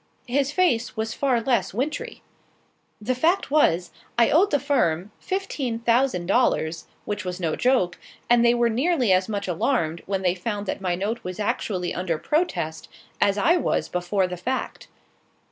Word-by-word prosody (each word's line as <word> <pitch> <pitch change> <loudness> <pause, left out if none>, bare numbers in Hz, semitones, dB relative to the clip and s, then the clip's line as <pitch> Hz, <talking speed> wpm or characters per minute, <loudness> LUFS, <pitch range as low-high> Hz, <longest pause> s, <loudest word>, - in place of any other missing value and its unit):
His 275 +3 +1
face 275 -10 +1
was 220 0 -2
far 260 -4 +1
less 225 -6 0
wintry. 275 +7 -3 0.8
The 225 +4 -1
fact 320 +6 +1
was, 180 - +3 0.3
I 235 -1 +4
owed 365 +6 +4
the 290 - +2
firm 210 - 0
fifteen 295 -11 -3
thousand 235 -5 +1
dollars, 170 -6 +1 0.2
which 205 -2 -3
was 180 0 -4
no 165 -3 -1
joke; 245 -9 +1 0.3
and 240 0 +4
they 240 0 +5
were 240 0 +3
nearly 250 - +2
as 185 +2 +1
much 200 -2 -3
alarmed, 170 - 0
when 195 -1 -1
they 180 -1 +3
found 205 +2 -4
that 195 - -4
my 180 -2 0
note 210 +6 -3
was 180 +1 -6
actually 185 -3 -2
under 175 -3 -2
protest, 295 - -2 0.3
as 200 0 +3
I 335 - +4
was - - -1
before 180 +2 0
the 180 0 -5
fact. 255 +9 -4
220 Hz, 165 wpm, -24 LUFS, 180-260 Hz, 0.8 s, they